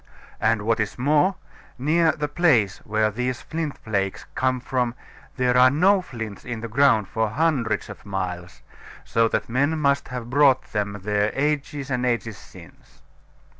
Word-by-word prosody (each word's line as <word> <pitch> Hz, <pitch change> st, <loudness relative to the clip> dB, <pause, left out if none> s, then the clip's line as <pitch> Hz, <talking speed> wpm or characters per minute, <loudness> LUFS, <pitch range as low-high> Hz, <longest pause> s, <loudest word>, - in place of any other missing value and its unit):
And 110 Hz, -1 st, +1 dB
what 115 Hz, +1 st, +1 dB
is 105 Hz, -2 st, -2 dB
more, 150 Hz, +9 st, +2 dB, 0.4 s
near 160 Hz, +5 st, +3 dB
the 150 Hz, -1 st, -3 dB
place 140 Hz, -, +2 dB
where 110 Hz, 0 st, 0 dB
these 125 Hz, +3 st, -3 dB
flint 160 Hz, -3 st, -4 dB
flakes 100 Hz, -3 st, -3 dB
come 130 Hz, -1 st, 0 dB
from 125 Hz, -1 st, -1 dB, 0.4 s
there 125 Hz, -1 st, +2 dB
are 125 Hz, +1 st, +7 dB
no 185 Hz, +8 st, +3 dB
flints 115 Hz, -, -7 dB
in 120 Hz, -2 st, -5 dB
the 115 Hz, -, -4 dB
ground 115 Hz, -4 st, +3 dB
for 110 Hz, +1 st, -1 dB
hundreds 125 Hz, -5 st, 0 dB
of -, -, -11 dB
miles; 90 Hz, -3 st, -5 dB, 0.4 s
so 115 Hz, 0 st, +2 dB
that -, -, -2 dB
men 140 Hz, +7 st, +1 dB
must 140 Hz, -2 st, +1 dB
have 125 Hz, -2 st, -6 dB
brought 140 Hz, -1 st, +4 dB
them 105 Hz, -1 st, -3 dB
there 105 Hz, 0 st, +1 dB
ages 145 Hz, -1 st, -2 dB
and 125 Hz, -1 st, 0 dB
ages 120 Hz, -3 st, -1 dB
since. -, -, -16 dB
125 Hz, 160 wpm, -23 LUFS, 110-145 Hz, 0.4 s, are